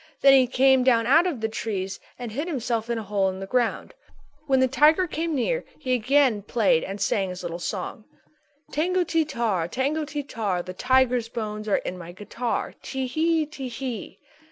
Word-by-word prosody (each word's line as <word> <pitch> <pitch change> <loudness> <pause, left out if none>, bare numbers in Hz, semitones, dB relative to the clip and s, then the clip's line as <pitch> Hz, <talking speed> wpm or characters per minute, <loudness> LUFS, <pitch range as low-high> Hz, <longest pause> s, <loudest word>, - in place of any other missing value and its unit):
Then 275 0 +7
he 260 -2 +6
came 265 +1 +4
down 235 -3 +3
out 320 +9 +5
of 285 -11 -3
the 220 - +1
trees 195 -4 -4 0.2
and 245 -3 -6
hid 290 +9 -3
himself 235 -7 -2
in 235 - 0
a 225 - -4
hole 200 -1 +1
in 190 0 -6
the 195 - -5
ground. 240 +2 -1 0.5
When 265 -2 +3
the 260 - +4
tiger 305 +7 +4
came 330 -1 -2
near - - 0
he 255 -4 -2
again 250 -2 +3
played 200 -6 +2
and 195 +1 -5
sang 195 -1 0
his 180 0 -7
little 170 0 -4
song: 195 +4 -5 0.7
"_Tango 360 +4 +1
ti 325 0 +2
tar, 220 - -1
tango 280 - -1
ti 295 -1 -4
tar, 205 -9 -2
The 185 - -7
tiger's 250 +1 +2
bones 215 -2 -5
are 205 - +3
in 180 - -5
my 170 0 -9
guitar. 225 +5 -3
Tee 265 -1 -3
hee, 315 +4 +1
Tee 285 -3 -7
hee. 245 -2 -6
245 Hz, 195 wpm, -25 LUFS, 210-280 Hz, 0.7 s, Then